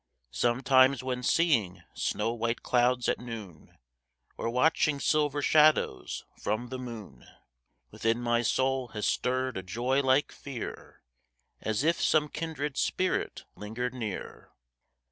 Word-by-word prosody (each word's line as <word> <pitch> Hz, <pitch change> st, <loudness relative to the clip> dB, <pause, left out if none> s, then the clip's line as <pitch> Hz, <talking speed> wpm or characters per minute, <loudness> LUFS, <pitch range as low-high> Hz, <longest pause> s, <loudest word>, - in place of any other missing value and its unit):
Sometimes 130 Hz, -, +3 dB
when 125 Hz, -1 st, -2 dB
seeing 125 Hz, -, +1 dB
snow 115 Hz, -, -1 dB
white 115 Hz, 0 st, -2 dB
clouds 125 Hz, 0 st, +2 dB
at -, -, +1 dB
noon, 110 Hz, -9 st, -9 dB, 0.6 s
Or -, -, -3 dB
watching 145 Hz, +3 st, +2 dB
silver 145 Hz, -1 st, +1 dB
shadows 155 Hz, -, +3 dB, 0.2 s
from 110 Hz, +4 st, -2 dB
the 130 Hz, 0 st, -5 dB
moon, 110 Hz, -, -9 dB, 0.6 s
Within 115 Hz, +1 st, 0 dB
my 120 Hz, -1 st, +1 dB
soul 130 Hz, +2 st, +1 dB
has 105 Hz, -, -1 dB
stirred 130 Hz, -1 st, 0 dB
a -, -, -3 dB
joy 120 Hz, +9 st, 0 dB
like 135 Hz, +1 st, +2 dB
fear, 135 Hz, -5 st, -8 dB, 0.6 s
As 110 Hz, +4 st, -1 dB
if 165 Hz, +2 st, +2 dB
some 150 Hz, -1 st, +3 dB
kindred 150 Hz, -3 st, -4 dB
spirit 185 Hz, 0 st, -1 dB
lingered 120 Hz, +4 st, -4 dB
near. 110 Hz, -6 st, -6 dB
125 Hz, 125 wpm, -29 LUFS, 115-140 Hz, 0.6 s, Sometimes